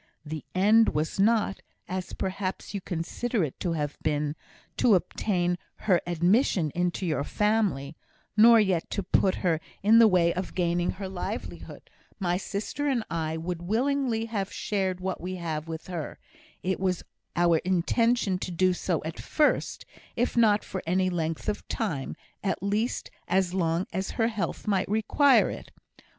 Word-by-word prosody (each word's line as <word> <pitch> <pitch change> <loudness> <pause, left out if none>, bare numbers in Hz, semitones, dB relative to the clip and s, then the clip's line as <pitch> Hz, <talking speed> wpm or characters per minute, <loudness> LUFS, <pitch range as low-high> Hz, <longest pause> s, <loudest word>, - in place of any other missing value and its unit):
The 155 -1 -5
end 215 +3 +5
was 155 +5 -1
not, 210 -1 +2 0.3
as 185 0 -4
perhaps 190 +1 -4
you 200 - -3
consider 190 +6 -2
it 145 - -4
to 175 - -1
have 150 -2 -3
been, 150 -1 0 0.4
to 230 -5 +5
obtain 180 -1 0 0.3
her 185 -5 +4
admission 175 - +2
into 180 +1 -1
your 155 -4 0
family 200 -8 0 0.4
nor 230 +2 +8
yet 190 -6 +1
to 200 - -2
put 190 0 +2
her 165 -3 +2 0.2
in 220 +3 +7
the 230 - +8
way 175 -4 +3
of 185 +1 -5
gaining 175 -1 +1
her 190 0 -6
livelihood; 185 -1 -6 0.3
my 175 -3 +1
sister 205 +9 -3
and 255 -5 +1
I 160 -1 -2
would 170 +1 -4
willingly 235 +3 0
have 200 -3 -3
shared 190 -3 -1
what 185 0 -3
we 185 +2 -4
have 160 -3 -4
with 160 0 -6
her; 170 -5 -5 0.5
it 190 +1 -1
was 185 -2 0 0.3
our 170 -1 +4
intention 190 +3 +1
to - - -4
do 185 +1 +2
so 175 -2 -1
at 160 - -5
first, 300 - 0 0.3
if 245 +1 0
not 215 -3 +4
for 190 - -5
any 185 +1 +2
length 165 -2 -2
of 210 - -2
time, 165 - -3 0.3
at 195 -1 -1
least 210 +5 -1 0.2
as 185 -1 +1
long 170 -1 +1
as 190 +2 -2
her 225 -1 +3
health 215 -3 -3
might 200 -3 +1
require 220 +7 +4
it. - - -8
185 Hz, 160 wpm, -27 LUFS, 170-210 Hz, 0.5 s, nor